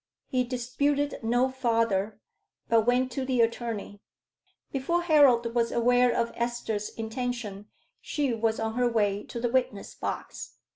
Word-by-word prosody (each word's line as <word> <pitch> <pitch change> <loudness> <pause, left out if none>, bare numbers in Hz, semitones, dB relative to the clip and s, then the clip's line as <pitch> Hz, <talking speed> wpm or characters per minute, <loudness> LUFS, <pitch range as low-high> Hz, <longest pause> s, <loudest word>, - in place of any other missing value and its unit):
He 255 -1 0
disputed 280 +4 -1
no 245 +3 +2
farther, 230 -5 0 0.5
but 230 -1 +3
went 250 +1 +2
to 265 +2 -3
the 260 -1 0
attorney. 225 -3 -2 0.7
Before 340 +6 0
Harold 265 -8 +4
was 235 -1 +1
aware 245 +1 +3
of 235 0 0
Esther's 235 -3 -2
intention 225 -3 -4 0.3
she 285 -5 -1
was 225 0 0
on 220 0 -2
her 245 +1 +2
way 205 -3 +1
to 235 - -6
the 240 0 0
witness 245 -6 -1
box. - - -6
240 Hz, 140 wpm, -27 LUFS, 225-255 Hz, 0.7 s, Harold